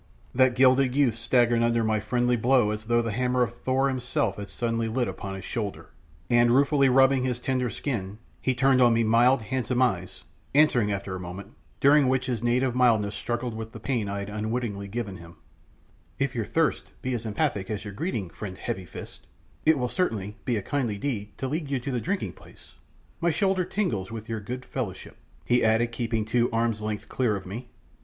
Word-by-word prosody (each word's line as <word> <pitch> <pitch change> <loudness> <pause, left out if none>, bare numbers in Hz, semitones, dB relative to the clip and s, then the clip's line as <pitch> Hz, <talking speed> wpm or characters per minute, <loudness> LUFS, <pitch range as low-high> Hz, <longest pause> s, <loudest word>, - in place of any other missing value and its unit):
That 130 -1 +4
gilded 130 0 +4
youth 140 -5 +3
staggered 115 +1 +2
under 115 0 +2
my 110 -1 +1
friendly 120 +3 +1
blow 120 -2 +3
as 105 0 -5
though 120 +1 +2
the 115 - -2
hammer 125 +2 +1
of 120 0 -3
Thor 130 +1 +2
himself 125 -5 -1
had 100 -1 -6
suddenly 115 -1 -1
lit 120 +2 0
upon 95 -1 -5
his 95 - -8
shoulder, 105 -5 -4 0.4
and 120 +2 +4
ruefully 140 +2 +4
rubbing 135 +1 +5
his 125 -2 -1
tender 125 0 -1
skin, 105 -7 -4 0.2
he 130 - 0
turned 130 +1 +4
on 120 -2 +5
me 115 - +3
mild, 120 +3 +4
handsome 125 +2 -1
eyes, 95 -7 -2 0.3
answering 125 -8 +4
after 100 -1 -3
a - - -5
moment, 90 +4 -8 0.3
during 140 0 +5
which 130 0 +1
his 125 -4 -2
native 125 +1 +1
mildness 110 -5 +3
struggled 120 +1 -3
with 110 0 -7
the 110 - -8
pain 110 -3 -1
I 100 - -3
had 100 0 -5
unwittingly 105 -1 -3
given 100 -2 -4
him 85 0 -13 0.8
"If 135 -1 0
your 115 -3 -2
thirst 160 +6 -1
be 130 -1 -1
as 115 -2 -3
emphatic 105 -4 -1
as 105 0 -4
your 105 - -6
greeting, 105 - -3
friend 95 -3 -7
Heavy 95 0 -4
fist, - - -11 0.4
it 160 -1 +6
will 125 -1 0
certainly 110 - -2
be 120 -3 +1
a 100 - -3
kindly 120 -6 -1
deed 105 -4 -4
to 135 - -3
lead 150 +1 -3
you 135 -2 0
to 135 +3 -4
the 125 -2 -1
drinking 195 - -2
place. - - -17 0.5
My 170 - +2
shoulder 185 +2 +1
tingles 115 - -2
with 115 -1 -7
your 115 -1 -3
good 125 +5 -6
fellowship," 115 -9 -5 0.3
he 125 0 +3
added, 115 +1 +3
keeping 115 -2 -1
two 120 +2 +2
arms' 115 -2 0
lengths 105 -1 -3
clear 120 -5 0
of 95 - -6
me. 115 +7 -7
120 Hz, 200 wpm, -26 LUFS, 105-130 Hz, 0.8 s, it